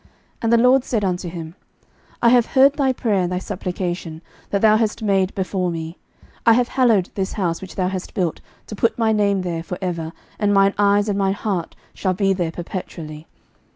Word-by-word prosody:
11:009:003 - - -29 0.3
And 230 0 +1
the - - +6
LORD 250 +2 +5
said 220 -6 -1
unto 180 -1 -2
him, 165 -1 -8 0.7
I 235 - +7
have 245 -1 +5
heard 270 +1 +5
thy 275 -3 +1
prayer 220 -6 0
and 180 0 -1
thy 180 - -1
supplication, 175 -3 -4 0.3
that 200 - 0
thou 215 0 +6
hast 220 0 -1
made 195 -2 +1
before 185 -1 -1
me: 165 0 -6 0.4
I 230 - +6
have 245 +1 +2
hallowed 225 -8 +2
this 190 -1 -3
house, 170 -5 -1
which 190 - -9
thou 185 -1 0
hast 185 0 -5
built, 175 -4 -1 0.2
to 215 - -7
put 230 - +1
my 225 -2 +2
name 200 -3 +1
there 170 -2 -3
for 180 +2 -6
ever; 170 -4 -3 0.3
and 205 -1 +2
mine 195 0 +4
eyes 205 0 +3
and 200 -1 0
mine 195 0 +1
heart 195 -6 -3 0.2
shall 185 -2 -1
be 195 +1 +2
there 175 -3 -1
perpetually. 165 -3 -7
195 Hz, 205 wpm, -21 LUFS, 180-215 Hz, 0.7 s, I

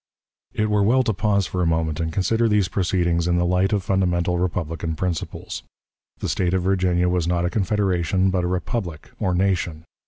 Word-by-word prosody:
It 105 - +1
were 105 -1 +3
well 125 +6 +4
to 110 - 0
pause 100 0 +1
for 90 - -3
a 85 - +2
moment 80 -1 0
and 80 -1 -1
consider 110 +6 +1
these 105 -3 +2
proceedings 85 -2 0
in 85 0 +2
the 90 - +2
light 90 +3 +2
of 100 -3 0
fundamental 90 -2 +1
republican 85 -2 -2
principles. 85 -7 -4 0.6
The - - -4
State 90 0 0
of 95 - 0
Virginia 90 -2 +2
was 90 -2 0
not 85 0 +1
a 90 - -1
confederation, 95 -3 +1
but 90 -1 0
a - - 0
republic, 90 -2 -3
or 90 -1 0
nation. 90 -4 0
90 Hz, 190 wpm, -23 LUFS, 85-95 Hz, 0.6 s, well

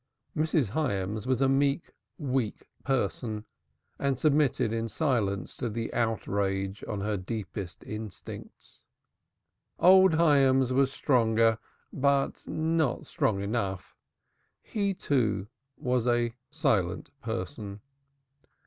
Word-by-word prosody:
Mrs. 155 - +1
Hyams 105 -5 -1
was 130 0 +2
a - - +4
meek, 140 +3 +1 0.2
weak 130 - -2 0.2
person 110 -3 -1 0.5
and 140 -2 0
submitted 145 -6 +2
in 115 0 -1
silence 110 - 0
to 120 - -2
the 115 +1 -4
outrage 100 -4 -1
on 105 -2 -3
her 105 0 -1
deepest 95 -1 -5
instincts. 105 -1 -9 1.0
Old 190 -1 +7
Hyams 135 -5 +4
was 135 0 +3
stronger, 115 -5 +3 0.3
but 140 0 +1
not 160 -4 0
strong 100 -2 0
enough. 100 -3 -3 0.7
He, 200 -3 -1
too, 120 - 0 0.3
was 125 -4 0
a 120 -1 +2 0.2
silent 130 - 0
person. 110 -3 -5
120 Hz, 105 wpm, -29 LUFS, 105-140 Hz, 1.0 s, Old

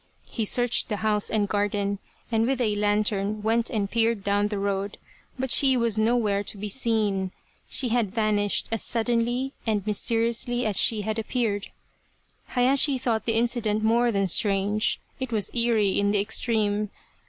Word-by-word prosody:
He 225 - -2
searched 245 +2 +1
the 210 - -1
house 210 -1 +2
and 210 -2 0
garden, 205 -1 -1 0.3
and 225 0 +2
with 265 -1 0
a 215 -4 +1
lantern 205 0 0
went 230 +1 +1
and 210 -5 -1
peered 225 -1 0
down 205 +1 +1
the 210 -1 -4
road, 200 0 -2 0.4
but 260 -1 -3
she 265 -2 +4
was 230 -3 +1
nowhere 215 -3 +1
to 205 - -4
be 210 +2 -5
seen. 210 -5 0 0.4
She 255 - +2
had 225 -4 0
vanished 210 -2 +1
as 225 - -1
suddenly 240 +3 -1
and 210 -3 0
mysteriously 230 +3 0
as 210 -3 +3
she 220 -2 +3
had 215 +2 -2
appeared. 220 -3 -2 0.8
Hayashi 270 +2 +2
thought 235 -3 -1
the 225 -1 +1
incident 230 -3 0
more 235 +2 +3
than 195 -2 0
strange; 200 +3 +1 0.2
it 260 -2 -4
was 215 -3 0
eerie 225 -5 +2
in 200 0 +1
the 205 0 +1
extreme. 210 -1 0
220 Hz, 165 wpm, -25 LUFS, 205-235 Hz, 0.8 s, she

